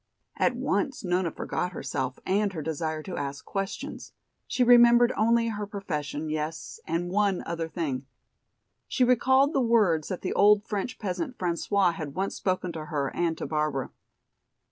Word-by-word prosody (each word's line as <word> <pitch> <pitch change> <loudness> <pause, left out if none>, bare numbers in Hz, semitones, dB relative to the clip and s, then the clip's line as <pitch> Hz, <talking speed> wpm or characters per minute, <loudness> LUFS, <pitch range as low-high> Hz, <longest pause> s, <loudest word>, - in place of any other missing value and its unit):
At - - +1
once 275 -8 -1
Nona 180 -1 +1
forgot 180 +3 -3
herself 130 -3 -3
and 200 +1 +1
her 160 -4 -4
desire 155 0 -3
to 185 - -6
ask 140 0 -4
questions. 195 -1 -5 0.3
She 255 - +1
remembered 240 0 +7
only 230 +1 +3
her 210 -2 -4
profession, 155 -7 -4
yes, 155 +1 -4
and 175 +2 -1
one 200 -1 +1
other 165 -1 -3
thing. 140 -7 -3 0.8
She 255 - +1
recalled 260 +3 +4
the 275 - +2
words 210 -10 +3
that 185 - -4
the 185 - -1
old 210 0 +5
French 210 +4 -3
peasant, 240 - -3
François, 180 +1 +1
had 150 -4 -6
once 195 +1 -1
spoken 185 -1 -1
to 160 -2 -6
her 145 -3 -2
and 170 -2 0
to - - -4
Barbara. 150 -4 -1
180 Hz, 160 wpm, -27 LUFS, 155-210 Hz, 0.8 s, remembered